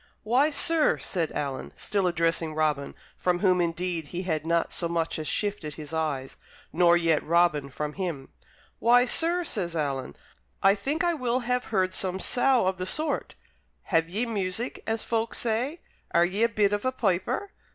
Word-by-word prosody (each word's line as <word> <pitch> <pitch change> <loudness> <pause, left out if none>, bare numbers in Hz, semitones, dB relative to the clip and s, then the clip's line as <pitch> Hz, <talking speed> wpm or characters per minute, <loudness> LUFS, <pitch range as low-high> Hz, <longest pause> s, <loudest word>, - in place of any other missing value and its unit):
"Why, 250 +7 +3
sir," 315 +1 +3
said 170 -5 -1
Alan, 140 -2 -4
still 200 -3 -1
addressing 165 -2 0
Robin, 150 -3 0 0.2
from 180 -1 +1
whom 180 -1 +3
indeed 170 -1 -2
he 180 +4 -4
had 160 -3 -2
not 170 0 +1
so 170 - -2
much 165 -1 -1
as 155 - -4
shifted 200 -5 -1
his 155 0 -8
eyes, 150 -5 -2 0.4
nor 175 0 +5
yet 165 -2 +2
Robin 165 -4 +2
from 150 +2 -4
him, 170 -8 -4 0.5
"why, 245 +2 +5
sir," 335 +7 +1
says 180 - -2
Alan, 140 -4 -2 0.5
"I 195 0 +7
think 275 - -2
I 345 0 +2
will 255 -4 0
have 250 +1 -1
heard 185 -3 0
some 185 0 -1
sough 250 +1 +2
of 190 0 0
the 185 0 -3
sort. 305 +8 -1 0.6
Have 165 0 +3
ye 215 +7 -1
music, 210 +1 -2
as 225 0 0
folk 230 0 -1
say? 245 +8 -1 0.3
Are 170 0 +6
ye 190 +4 -2
a 230 - +4
bit 205 -3 +2
of 205 - -1
a 255 - +1
piper?" 245 - -1
185 Hz, 175 wpm, -27 LUFS, 165-230 Hz, 0.6 s, I